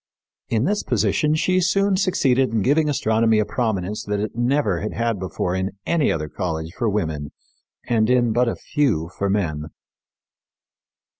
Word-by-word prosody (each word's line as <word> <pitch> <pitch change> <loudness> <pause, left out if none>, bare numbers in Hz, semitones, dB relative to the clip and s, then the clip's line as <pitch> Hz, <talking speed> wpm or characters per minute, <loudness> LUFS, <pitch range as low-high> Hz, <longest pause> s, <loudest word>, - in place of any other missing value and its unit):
In 115 0 +1
this 205 +5 +1
position 150 0 +1
she 185 +3 +2
soon 195 +2 +2
succeeded 135 - +2
in 110 -2 0
giving 150 +5 +2
astronomy 110 -4 +2
a 105 - +2
prominence 105 -5 -2
that 105 0 -1
it 105 +1 -3
never 120 - +1
had 105 - -3
had 115 -3 -1
before 90 -1 -2
in 95 +2 -3
any 165 -4 +2
other 75 -1 -2
college 80 0 -4
for 115 - 0
women, 80 -8 -2 0.6
and 110 -2 +2
in 120 -3 +3
but 125 +2 +2
few 120 - 0
for 100 - -1
men. 80 -7 -1
110 Hz, 155 wpm, -22 LUFS, 95-140 Hz, 0.6 s, in